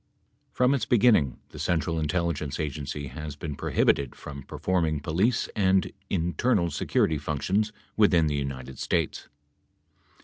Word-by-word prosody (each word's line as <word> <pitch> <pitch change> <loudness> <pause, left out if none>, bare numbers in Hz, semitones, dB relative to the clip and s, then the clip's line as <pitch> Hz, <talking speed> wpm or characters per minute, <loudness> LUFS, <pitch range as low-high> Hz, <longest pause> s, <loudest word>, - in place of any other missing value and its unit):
From 125 +2 +3
its 140 - -1
beginning, 105 - +4
the - - -11
Central 80 -1 0
Intelligence 80 -3 -1
Agency 75 -1 -4
has 75 +3 -6
been 75 0 -5
pro - - -4
hibited 70 -3 +2
from 70 -1 -8
performing 80 +2 -1
police 95 - +1
and 95 -2 +2 0.2
internal 90 +1 +1
security 75 +1 +1
functions 95 +9 0 0.3
within 95 -6 +5
the 75 - 0
United 65 -2 -4
States. - - -1
80 Hz, 130 wpm, -27 LUFS, 70-95 Hz, 0.3 s, within